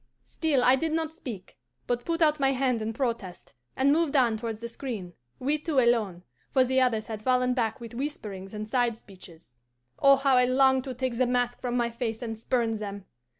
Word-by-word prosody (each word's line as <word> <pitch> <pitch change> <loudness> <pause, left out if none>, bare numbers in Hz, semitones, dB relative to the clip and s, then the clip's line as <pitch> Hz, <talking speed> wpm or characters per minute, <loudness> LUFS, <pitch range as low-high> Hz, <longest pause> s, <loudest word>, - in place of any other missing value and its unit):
"Still 295 -6 0
I 255 +1 +6
did 320 +3 -1
not 320 -1 -1
speak, 220 - -9 0.3
but 245 0 -2
put 335 0 +1
out 305 -1 +3
my 270 0 +3
hand 255 -3 0
in 215 +1 -2
protest, 230 - -4 0.2
and 275 +1 +3
moved 310 -1 +1
on 245 -5 +4
towards 225 -1 -4
the 235 - -5
screen, 230 -7 -6 0.2
we 290 +4 0
two 305 -1 -3
alone, 220 -8 +1 0.3
for 260 - +4
the 260 +1 +2
others 225 -4 +1
had 220 -2 -6
fallen 250 +1 +2
back 240 0 -1
with 235 -1 -9
whisperings 215 -8 -5
and 210 0 -5
side 240 -1 +1
speeches. 180 - -16 0.5
Oh, 275 0 +7
how 270 -1 +3
I 250 - +5
longed 265 +1 +3
to 260 -2 -5
take 255 -1 -2
the 255 - +3
mask 245 0 0
from 245 0 -1
my 235 -1 0
face 230 0 -4
and 225 -1 -4
spurn 230 +1 0
them! 200 -2 -6
245 Hz, 205 wpm, -27 LUFS, 225-265 Hz, 0.5 s, Oh